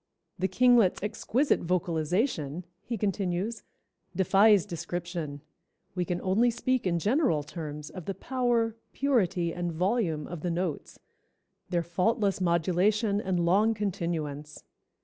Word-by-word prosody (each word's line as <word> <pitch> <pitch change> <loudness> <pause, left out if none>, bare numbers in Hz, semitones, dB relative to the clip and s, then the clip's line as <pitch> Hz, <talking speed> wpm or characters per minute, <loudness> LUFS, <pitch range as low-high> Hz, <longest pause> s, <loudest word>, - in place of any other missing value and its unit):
"The 190 - +1
Kinglet's 230 -1 +4
exquisite 230 +6 +1
vocalization," 170 - -1 0.2
he 230 +3 -4
continues, 195 +1 -1 0.5
"defies 195 +1 +5
description; 170 -4 -5 0.5
we 180 -1 -1
can 175 +1 -2
only 210 +6 +3
speak 245 -1 0
in 170 -1 +1
general 205 - +1
terms 150 -1 -7
of 185 -4 -8
the 195 - -3
power, 240 0 0 0.2
purity 190 -11 +1
and 175 -1 -3
volume 175 -3 0
of 175 -3 -7
the 180 - -2
notes, 170 -2 -3 0.7
their 170 -1 0
faultless 195 +3 0
modulation 190 +5 +2
and 180 -3 0
long 210 +6 +3
continuance. 165 -7 -3
185 Hz, 120 wpm, -28 LUFS, 170-215 Hz, 0.7 s, defies